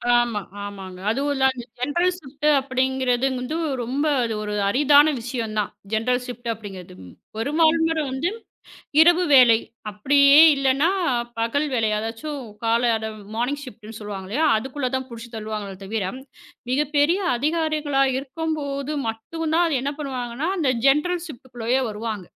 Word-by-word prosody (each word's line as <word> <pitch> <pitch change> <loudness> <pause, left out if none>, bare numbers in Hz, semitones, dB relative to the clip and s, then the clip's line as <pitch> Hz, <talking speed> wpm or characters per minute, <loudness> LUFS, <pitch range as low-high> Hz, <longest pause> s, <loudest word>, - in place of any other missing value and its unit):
ஆமா, 240 -3 +1 0.2
ஆமாங்க. 195 -2 -8
அதுவும் 275 +6 0
இல்ல, 265 - -1
அந்த 250 -2 -8 0.2
ஜெனரல் 345 +8 +1
ஷிப்ட் 290 -1 -4
அப்படிங்கறது 260 -1 0
வந்து 250 +5 -4 0.3
ரொம்ப 265 +6 -2 0.2
அது 230 -1 -2
ஒரு 210 0 -4 0.2
அரிதான 290 +6 +5
விஷயம் 230 -2 -4
தான். 205 - -1 0.2
ஜெனரல் 250 +3 +1
ஷிப்ட் 240 -2 -7
அப்படிங்கறது. 195 - -10 0.4
பெரும்பாலும் 320 +6 +2
நேரம் 315 -4 -1
வந்து, 280 +7 -1 0.7
இரவு 345 +2 +5
வேலை, 245 -4 +7 0.3
அப்படியே 280 +7 +5 0.2
இல்லன்னா 275 +4 +2 0.5
பகல் 285 +7 0
வேலை, 225 -3 +1
அதாச்சும் 230 +7 -5 0.2
கால 235 +1 +2 0.4
மார்னிங்ஷிப்ட்னு 240 -3 -4
சொல்லுவாங்க 200 -3 -7
இல்லையா? 295 +9 +1
அதுக்குள்ள 260 +3 -3
தான் 260 0 -3
புடிச்சு 235 0 -9
தள்ளுவாங்களே 215 -3 -5
தவிர, 205 -1 -2 0.7
மிகப்பெரிய 295 +5 +2 0.2
அதிகாரிகளாக 295 -3 0
இருக்கும்போது 280 0 -4 0.2
மட்டும்தான் 320 +7 -1
என்ன 285 +2 -2
பண்ணுவாங்கன்னா, 260 +2 -3
அந்த 280 -6 +2 0.2
ஜெனரல் 335 +5 +2
ஷிப்ட்குள்ளேயே 250 -2 -3
வருவாங்க. 215 -2 -5
260 Hz, 125 wpm, -23 LUFS, 225-295 Hz, 0.7 s, வேலை